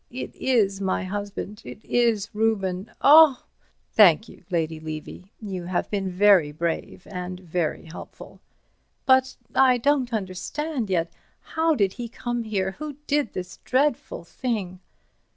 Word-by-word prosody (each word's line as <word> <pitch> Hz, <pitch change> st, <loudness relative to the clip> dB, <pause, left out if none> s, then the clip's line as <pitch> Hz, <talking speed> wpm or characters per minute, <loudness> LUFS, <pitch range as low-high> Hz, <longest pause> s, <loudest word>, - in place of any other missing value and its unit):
It 255 Hz, +2 st, -7 dB
is 205 Hz, -7 st, +1 dB
my 190 Hz, 0 st, 0 dB
husband. 205 Hz, +2 st, -5 dB
It 220 Hz, -, -11 dB
is 230 Hz, -4 st, +1 dB
Reuben. 210 Hz, -3 st, -1 dB
Oh—" 300 Hz, -2 st, +7 dB, 0.5 s
"Thank 210 Hz, 0 st, +6 dB
you, -, -, -15 dB
Lady 160 Hz, -3 st, -1 dB
Levy. 155 Hz, +4 st, -8 dB
You 190 Hz, -5 st, -6 dB
have 180 Hz, 0 st, -2 dB
been 195 Hz, -2 st, -1 dB
very 185 Hz, -4 st, +4 dB
brave 165 Hz, +3 st, -4 dB
and 180 Hz, -1 st, -6 dB
very 175 Hz, -3 st, -3 dB
helpful." 160 Hz, +1 st, -11 dB, 0.7 s
"But—I 260 Hz, 0 st, +3 dB
don't 265 Hz, 0 st, +1 dB
understand 225 Hz, -, -3 dB
yet. 170 Hz, -3 st, 0 dB, 0.3 s
How 320 Hz, 0 st, 0 dB
did 200 Hz, -6 st, +1 dB
he 240 Hz, -1 st, -6 dB
come 240 Hz, 0 st, -3 dB
here? 190 Hz, -3 st, -1 dB
Who 305 Hz, -1 st, -5 dB
did 290 Hz, -6 st, 0 dB
this 180 Hz, 0 st, -6 dB
dreadful 265 Hz, -7 st, 0 dB
thing?" 190 Hz, -3 st, -4 dB
205 Hz, 135 wpm, -24 LUFS, 180-245 Hz, 0.7 s, Oh